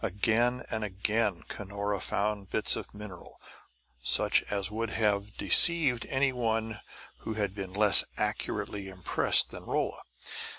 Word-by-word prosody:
Again 115 +5 0
and 110 -1 -2
again 105 -1 -1
Cunora 100 0 -4
found 100 -1 -3
bits 110 - +2
of - - -8
mineral 100 -3 -11 0.6
such - - +4
as 100 0 -2
would 115 +1 -3
have 105 -1 -1
deceived 155 -9 +5
any 135 0 0
one 110 -3 -2 0.4
who 110 - -6
had 100 -3 -2
been 95 -2 -6
less 105 0 +6
accurately 100 -2 -3
impressed 95 -1 +2
than - - -9
Rolla. - - -2
105 Hz, 130 wpm, -29 LUFS, 100-115 Hz, 0.6 s, less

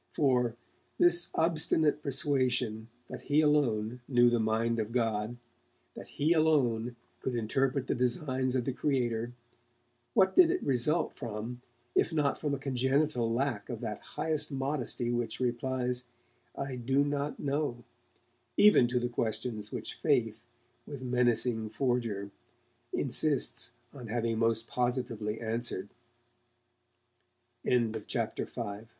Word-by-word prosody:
For, 125 -5 +2 0.4
this 175 0 +6
obstinate 160 -2 +2
persuasion 130 -6 +1 0.2
that - - -8
he 150 +1 +2
alone 125 -6 +1
knew 120 -2 +4
the 120 - +2
mind 115 +1 0
of 110 0 -3
God, 115 -1 -1 0.6
that - - -9
he 155 +4 +1
alone 125 -8 +2 0.2
could 130 - -3
interpret 130 +4 0
the - - 0
designs 130 +1 0
of 125 -2 0
the 135 - -1
Creator, 120 -4 -1 0.8
what 190 0 +4
did 360 -3 +7
it 365 +1 -1
result 145 +6 +1
from 120 0 -6 0.3
if - - +2
not 150 -3 0
from 145 -2 -1
a - - -5
congenital 130 -1 0
lack 120 -3 -1
of 120 -3 -5
that 110 -3 -4
highest 155 -2 -1
modesty 135 -3 -1
which 120 -1 -2
replies 125 0 -1 0.5
'I 135 -2 -4
do 135 +4 +1
not 145 0 -2
know' 140 -4 -2 0.7
even 205 -12 +6
to 125 +1 0
the 120 - -1
questions 110 -2 -2
which - - -5
Faith, 120 -6 0 0.4
with 140 -3 -7
menacing 120 -2 +2
forger, 115 -5 -2 0.6
insists - - +2 0.2
on 125 -5 -9
having 115 0 -1
most 115 0 +1
positively 120 -4 -2
answered? 115 -3 -2 1.8
CHAPTER 115 -1 0
VI 125 - -7
DURING 100 -2 -5
t - - -28
125 Hz, 130 wpm, -30 LUFS, 115-140 Hz, 1.8 s, did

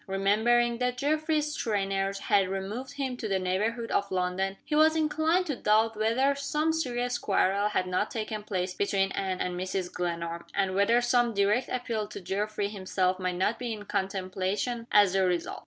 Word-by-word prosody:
Remembering 225 +5 +2
that 250 0 0
Geoffrey's 305 +2 0
trainers 195 -4 -1
had 195 -2 +2
removed 205 +8 -4
him 270 -3 -3
to 225 - -4
the 195 -2 +1
neighborhood 210 +6 -1
of 200 - 0
London, 185 +1 -1
he - - -5
was 315 +1 +5
inclined 315 +3 +2
to 295 -5 -2
doubt 220 0 +2
whether 230 +6 +2
some 300 +3 0
serious 245 -5 -1
quarrel 200 0 +2
had 185 - 0
not 185 0 -1
taken 215 -1 -4
place 185 -3 -3
between 195 0 0
Anne 190 -2 -2
and 180 - -2
Mrs. 185 0 -3
Glenarm 170 -1 -3
and 195 -1 +1
whether 200 +5 +3
some 240 -2 +2
direct 205 +5 +2
appeal 230 -4 -2
to - - -8
Geoffrey 205 +2 -2
himself 185 -2 -1
might 185 -1 -1
not 190 +5 0
be 240 -2 -3
in 210 -1 -8
contemplation 195 +5 -2
as 205 -3 +5
the 195 0 +3
result. 180 -2 -1
210 Hz, 175 wpm, -28 LUFS, 190-245 Hz, -, was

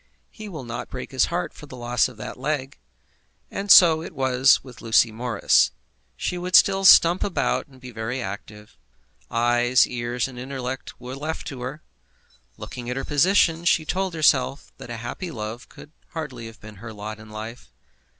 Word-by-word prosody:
He 215 -2 -9
will 155 -8 -7
not 120 -1 -6
break 130 +2 -7
his 130 -2 +3
heart 175 +1 -3
for 150 - -12
the 130 - -10
loss 120 0 +1
of 125 -4 -13
that 110 - -8
leg. 135 -1 -3 0.7
And 200 +1 -5
so 165 -4 +8
it 160 - -9
was 130 0 +3
with 125 -3 -13
Lucy 115 0 +3
Morris. 115 -1 +2 0.5
She 180 - -3
would 180 +1 -1
still 195 0 +5
stump 175 -1 +7
about 190 -3 -1
and 130 -2 -18
be 125 -1 -10
very 115 +3 -4
active. 105 0 -8 0.5
Eyes, 120 +1 +3
ears, 120 0 -3
and 125 -2 -10
intellect 130 0 -6
were 125 +1 -7
left 155 +3 -5
to 130 -3 -8
her. 135 +5 -6 0.7
Looking 120 -1 -7
at 125 - -3
her 135 - -3
position, 165 +2 +3
she 165 -2 +2
told 185 +1 -2
herself 140 -3 +2
that - - -10
a 120 - -5
happy 120 +10 -6
love 110 -2 -7
could 150 - -14 0.2
hardly 135 -8 -6
have 115 0 -13
been 105 -1 -12
her 115 +3 -9
lot 105 +1 -7
in 110 0 -13
life. 110 +3 -9
130 Hz, 180 wpm, -24 LUFS, 120-155 Hz, 0.7 s, so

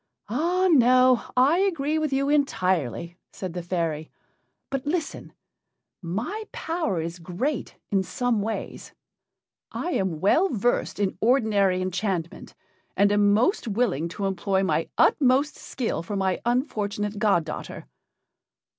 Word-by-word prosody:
"Ah 345 - +1
no! 255 -3 +5
I 280 +8 +5
agree 315 -6 0
with 310 -2 -1
you 275 +1 +1
entirely," 185 - 0
said 185 -3 -6
the 175 - -4
fairy. 165 -3 -2 0.6
"But 275 +1 -3
listen 320 -1 -3 0.7
my 225 - -4
power 325 - -2
is 165 +2 -5
great 195 - -3 0.2
in 195 -2 +3
some 225 +5 -1
ways. 220 +2 -5 0.8
I 355 - -3
am 185 - -1
well 325 - +3
versed 240 -3 0
in 200 -2 -1
ordinary 210 -6 +2
enchantment, 185 -2 -3 0.4
and 200 0 +4
am 205 0 +4
most 240 - +2
willing 195 - 0
to 200 - -2
employ 190 0 0
my 190 - 0
utmost 275 +1 +3
skill 245 -9 -3
for 205 +5 -5
my 190 -1 0
unfortunate 210 -5 -1
god 200 -7 +2
daughter." - - -7
210 Hz, 130 wpm, -25 LUFS, 185-270 Hz, 0.8 s, no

